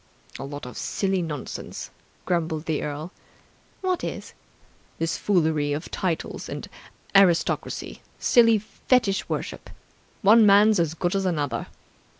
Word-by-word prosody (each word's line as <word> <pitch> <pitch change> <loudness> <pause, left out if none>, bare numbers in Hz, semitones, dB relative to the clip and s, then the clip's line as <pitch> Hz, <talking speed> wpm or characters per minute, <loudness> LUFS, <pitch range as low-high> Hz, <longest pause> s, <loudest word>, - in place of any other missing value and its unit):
"A - - -5
lot 145 0 -7
of 125 - -8
silly 190 -2 -1
nonsense!" 150 -5 -6 0.3
grumbled 160 -3 -1
the 160 -2 -1
earl. 150 +4 -5 0.7
"What 370 -2 -1
is?" - - -5 0.6
"This 165 +1 -1
foolery 155 -6 +1
of 150 - -5
titles 175 -4 -3
and - - -6 0.5
aristocracy. 185 -4 +2 0.2
Silly 230 -2 +5
fetish 215 0 0
worship! - - -4 0.5
One 220 +3 +7
man's 205 0 +6
as 165 -2 0
good 175 +2 -1
as 195 -1 +1
another. 145 -9 -1
175 Hz, 125 wpm, -25 LUFS, 155-200 Hz, 0.7 s, One